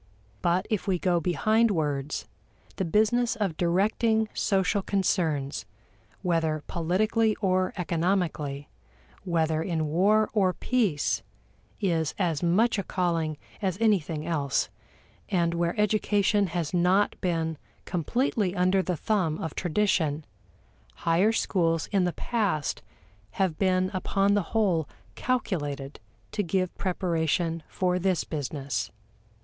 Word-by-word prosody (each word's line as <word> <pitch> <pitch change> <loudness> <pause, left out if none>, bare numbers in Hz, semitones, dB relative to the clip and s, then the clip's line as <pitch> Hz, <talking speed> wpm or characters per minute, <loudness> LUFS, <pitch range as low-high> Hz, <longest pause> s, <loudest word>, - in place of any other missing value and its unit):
But 175 +3 +1
if 210 -2 -1
we 190 -2 +2
go 175 -1 +1
behind 215 +7 +2
words, 150 -6 -1 0.5
the 190 - 0
business 220 +7 +2
of 200 -7 -1
directing 215 +6 +1
social 195 +1 +1
concerns, 165 -8 0 0.6
whether 160 -3 0
politically 215 +6 +1
or 185 -2 +1
economically, 165 -5 -1 0.6
whether 160 -3 +1
in 165 -2 -1
war 200 +8 +3
or 190 -4 +3
peace, 210 - 0 0.6
is 165 -6 0
as 170 -6 0
much 205 +6 +3
a - - -1
calling 165 -5 -1 0.2
as 190 -3 -1
anything 170 -9 +1
else; 145 -5 0 0.6
and 170 -4 +1
where 170 +3 -1
education 205 -1 +2
has 170 -1 -3
not 180 +3 +3
been 165 -3 -1 0.3
completely 195 - 0
under 185 +1 +3
the 180 -2 -2
thumb 180 -5 0
of 160 - -4
tradition, 160 -4 0 0.7
higher 175 +6 +2
schools 165 -7 +1
in 195 -3 +3
the 175 - -1
past 200 - -1 0.5
have 185 -5 0
been 185 -1 +2
upon 195 +1 +1
the 205 - +3 0.2
whole 175 -8 +2 0.2
calculated 145 - -2 0.3
to 210 - -1
give 185 -1 -1
preparation 165 -2 0
for 180 -1 0
this 185 -2 +1
business. 140 -7 -3
180 Hz, 120 wpm, -27 LUFS, 160-200 Hz, 0.7 s, war